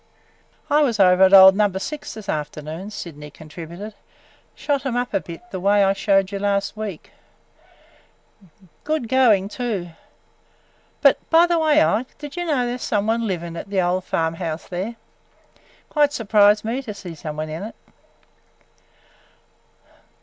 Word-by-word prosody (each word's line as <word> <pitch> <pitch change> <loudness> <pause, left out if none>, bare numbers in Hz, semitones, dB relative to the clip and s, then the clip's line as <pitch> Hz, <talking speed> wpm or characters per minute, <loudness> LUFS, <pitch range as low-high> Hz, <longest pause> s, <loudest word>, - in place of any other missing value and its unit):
"I 295 +1 +3
was 240 -7 +1
over 180 -1 +5
at 190 0 +7
old 190 -1 +9
Number 205 -2 +1
Six 295 +9 -6
this 215 -2 -10
afternoon," 155 +4 -5
Sydney 150 -7 -8
contributed. 170 +7 -10 0.6
"Shot 285 -2 -1
'em 255 -3 -2
up 245 0 -2
a - - +2
bit 165 0 -10
the 185 - -4
way 200 +2 +3
I 195 0 +3
showed 195 -1 +1
you 200 - -4
last 200 0 -1
week. 215 -6 -7 1.7
Good 305 -5 -2
going, 225 -6 +3
too. 210 -6 -4 1.1
But, - - +5
by 330 +1 +6
the 345 -1 +1
way, 310 -1 +4
Ike, 230 +5 -1
did 295 -1 -9
you 350 0 -3
know 280 -7 0
there 245 +1 -3
's - - -7
some 205 -1 0
one 225 +1 0
living 170 -3 -4
at 195 - -7
the 195 -2 +1
old 180 +1 0
farm 160 -2 -1
house 165 -2 -5
there? 190 +6 -4 0.9
Quite 295 -1 +2
surprised 210 -3 +3
me 240 +4 -2
to 220 -6 -8
see 185 -4 -8
some 150 -1 -7
one 155 0 -4
in 160 +3 -6
it!" 215 +3 -7
200 Hz, 160 wpm, -21 LUFS, 180-245 Hz, 1.7 s, old